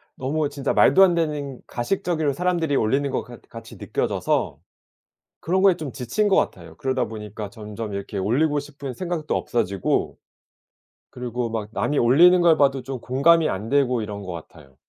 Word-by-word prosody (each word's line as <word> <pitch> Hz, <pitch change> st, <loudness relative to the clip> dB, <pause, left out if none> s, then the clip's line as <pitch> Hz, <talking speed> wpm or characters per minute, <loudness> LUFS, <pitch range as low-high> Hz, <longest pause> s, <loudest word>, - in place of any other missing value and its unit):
너무 145 Hz, +3 st, -1 dB
진짜 140 Hz, -1 st, -2 dB
말도 190 Hz, -, +5 dB
안 180 Hz, -3 st, +4 dB
되는 150 Hz, -5 st, -2 dB
가식적으로 155 Hz, +3 st, -1 dB
사람들이 170 Hz, -2 st, 0 dB
올리는 135 Hz, +5 st, +1 dB
것 -, -, -2 dB
같 120 Hz, -1 st, -13 dB
같이 115 Hz, 0 st, -11 dB
느껴져서 -, -, -1 dB, 0.8 s
그런 185 Hz, +3 st, 0 dB
거에 195 Hz, -2 st, +6 dB
좀 155 Hz, -5 st, -6 dB
지친 135 Hz, -, -1 dB
것 195 Hz, -, +3 dB
같아요. -, -, -2 dB
그러다 130 Hz, -3 st, -1 dB
보니까 105 Hz, -1 st, -7 dB
점점 105 Hz, -1 st, -7 dB
이렇게 100 Hz, +1 st, -5 dB
올리고 140 Hz, +10 st, +1 dB
싶은 140 Hz, -2 st, -8 dB
생각도 170 Hz, -1 st, -3 dB
없어지고 100 Hz, -5 st, -1 dB, 0.9 s
그리고 125 Hz, -1 st, -4 dB
막 110 Hz, -2 st, -4 dB
남이 145 Hz, +6 st, -1 dB
올리는 170 Hz, +10 st, +6 dB
걸 170 Hz, -2 st, +5 dB
봐도 135 Hz, -2 st, +2 dB
좀 135 Hz, -2 st, -5 dB
공감이 155 Hz, +7 st, +3 dB
안 105 Hz, +4 st, -4 dB
되고 130 Hz, -4 st, +2 dB
이런 105 Hz, -1 st, -6 dB
것 90 Hz, -2 st, -6 dB
같아요. 75 Hz, -4 st, -12 dB
135 Hz, 355 characters per minute, -23 LUFS, 115-155 Hz, 0.9 s, 거에